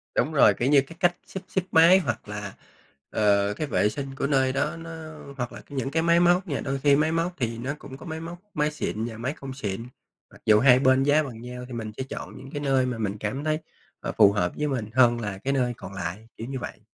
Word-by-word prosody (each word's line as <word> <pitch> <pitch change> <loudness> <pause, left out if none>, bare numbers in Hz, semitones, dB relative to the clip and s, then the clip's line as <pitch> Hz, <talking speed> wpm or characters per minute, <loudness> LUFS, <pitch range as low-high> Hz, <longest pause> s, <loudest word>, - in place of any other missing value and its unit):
Đúng 155 - +1
rồi, 125 -8 +6
kiểu 120 +6 0
như, 140 -2 +6
cái 165 +5 -12
cách 175 0 +3
xếp 190 - -7
xếp 190 - 0
máy 170 +4 +7
hoặc 120 - -3
là, 105 -1 -5 0.6
ờ, 100 -1 +2
cái 150 +8 -3
vệ 105 - +2
sinh 135 +3 -6
của 140 - -1
nơi 135 -2 +2
đó 145 +4 0
nó 165 0 -8 0.5
hoặc 120 -1 -3
là - - -8
nh 145 - -9
những 135 +1 -2
cái 160 +2 +1
máy 170 0 +4
móc 175 +2 +3
nha, 140 - -2
đôi 135 +1 -2
khi 140 0 +5
máy 155 +2 +2
móc 165 +2 0
thì 115 -3 -2
nó 130 +4 -3
cũng 135 0 -10
có - - -12
máy 160 -1 -5
móc 170 +1 -7
máy 150 0 +1
xịn 115 -6 -3
và 115 -2 -6
máy 125 +5 -2
không 135 -3 -8
xịn, 115 -2 -4 0.4
mặc - - -17
dù 105 -1 +6
hai 125 0 +6
bên 130 0 +4
giá 145 +2 +4
bằng 120 -5 -8
nhau 125 +1 -7
thì 125 - -9
mình 110 -2 -4
sẽ 130 - -2
chọn 130 - -7
những 135 +1 -11
cái 145 - -4
nơi 135 -2 +2
mà 125 -2 -2
mình 105 -2 -2
cảm 130 +7 -3
thấy, 155 0 0 0.4
ờ, - - -4
phù 100 -2 +7
hợp 90 -4 0
với 150 - 0
mình 125 -7 -2
hơn 120 -2 +5
là 105 -4 -4
cái 135 +7 -2
nơi 125 -3 +1
còn 100 - -9
lại, 95 +4 -5
kiểu 115 - -6
như 135 -1 -4
vậy. - - -7
130 Hz, 265 wpm, -26 LUFS, 115-150 Hz, 0.6 s, máy